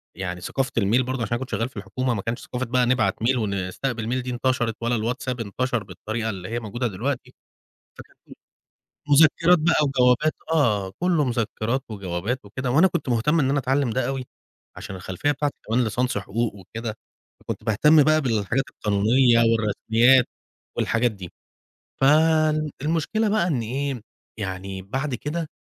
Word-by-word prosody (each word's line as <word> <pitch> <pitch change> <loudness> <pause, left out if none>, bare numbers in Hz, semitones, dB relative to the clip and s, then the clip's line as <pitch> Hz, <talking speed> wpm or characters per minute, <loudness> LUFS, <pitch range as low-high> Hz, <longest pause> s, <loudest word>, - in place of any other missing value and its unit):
يعني 90 -1 -5
ثقافة 130 +8 -2
الmail 110 +5 +3
برضه، 130 -1 -3
علشان - - -1
أنا 120 - 0
كنت 130 - -6
شغّال 115 +2 -1
في 130 - -16
الحكومة، 120 +6 -2
ما 100 - -2
كانش 115 +4 -3
ثقافة 125 0 -3
بقى 125 +1 +2
نبعت 120 -5 +2
mail 130 +3 +3
ونستقبل 110 +3 -2
mail - - -5
دي 125 - -5
انتشرِت، 120 -2 0
ولا 120 +1 0
الواتساب 120 +2 -2
انتشر 120 +2 -2
بالطريقة 110 +3 -4
اللي 95 -3 -6
هي 120 +1 -2
موجودة 120 +2 -3
دلوقتي، 125 +5 -4 0.7
فكان - - -14 0.9
مذكرات 160 +4 +5
بقى 165 +2 +3
وجوابات 135 +2 +3 0.2
آه، 105 -12 +2
كُلّه 175 -4 +2
مذكرات 120 +1 -1
وجوابات 100 +4 -4
وكده، 125 +5 -3
وأنا 160 +9 +5
كنت 135 - -3
مهتم 125 +8 +2
إن 135 -3 +2
أنا 140 +1 +2
أتعلم 135 0 +1
ده 130 +3 -1
أوي، 135 -1 -3 0.5
علشان 95 - -7
الخلفية 95 +10 -2
بتاعتي 145 0 -2
كمان 115 +3 +2
ليسانس 125 +1 -1
حقوق 105 +3 -2
وكده، 110 +3 -7 0.4
فكنت - - -6
باهتم 145 +8 +5
بقى 155 +2 +3
بالحاجات 120 0 0
القانونية 115 +4 +3
والرسميات 115 +3 +3 0.5
والحاجات 120 +1 +1
دي. 95 -5 -10 0.7
فالمشكلة 155 +6 +2
بقى 210 -4 +2
إن 140 -9 0
إيه، 130 +2 -3 0.4
يعني 95 -1 -5
بعد 130 +8 -3
كده 155 +5 -4
125 Hz, 155 wpm, -24 LUFS, 110-135 Hz, 0.9 s, مذكرات